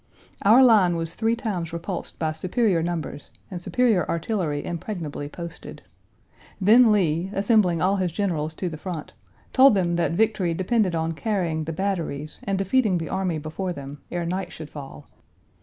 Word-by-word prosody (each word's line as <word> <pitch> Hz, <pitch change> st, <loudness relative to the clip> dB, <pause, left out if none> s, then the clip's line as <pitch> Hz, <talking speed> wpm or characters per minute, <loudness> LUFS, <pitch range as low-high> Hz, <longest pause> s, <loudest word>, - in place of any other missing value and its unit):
Our 230 Hz, +6 st, +7 dB
line 205 Hz, -8 st, +5 dB
was 165 Hz, 0 st, -1 dB
three 225 Hz, +3 st, +1 dB
times 190 Hz, -8 st, -3 dB
repulsed 170 Hz, +3 st, -5 dB
by 160 Hz, -1 st, -1 dB
superior 185 Hz, +3 st, +1 dB
numbers 165 Hz, -3 st, -4 dB, 0.2 s
and 180 Hz, -2 st, -5 dB
superior 225 Hz, -2 st, +2 dB
artillery 165 Hz, -4 st, -1 dB
impregnably 165 Hz, -5 st, -5 dB
posted. 170 Hz, +1 st, -9 dB, 0.8 s
Then 220 Hz, +4 st, +6 dB
Lee, 175 Hz, -3 st, +1 dB
assembling 195 Hz, -5 st, +3 dB
all 195 Hz, +2 st, +3 dB
his 185 Hz, -2 st, 0 dB
generals 160 Hz, -5 st, -2 dB
to 185 Hz, -, -3 dB
the 160 Hz, -2 st, -5 dB
front, 170 Hz, -3 st, -6 dB, 0.4 s
told 265 Hz, -3 st, +7 dB
them 175 Hz, -3 st, +1 dB
that 170 Hz, -, +1 dB
victory 195 Hz, -4 st, +1 dB
depended 185 Hz, 0 st, +1 dB
on 160 Hz, 0 st, -1 dB
carrying 165 Hz, -4 st, -1 dB
the 165 Hz, -, -3 dB
batteries 160 Hz, -5 st, -3 dB
and 195 Hz, -2 st, 0 dB
defeating 195 Hz, 0 st, +2 dB
the 165 Hz, -1 st, -4 dB
army 190 Hz, -4 st, -1 dB
before 160 Hz, +5 st, -4 dB
them, 140 Hz, -1 st, -9 dB
ere 175 Hz, -1 st, -3 dB
night 180 Hz, +1 st, -3 dB
should 155 Hz, -2 st, -9 dB
fall. 145 Hz, 0 st, -10 dB
175 Hz, 160 wpm, -24 LUFS, 160-200 Hz, 0.8 s, Our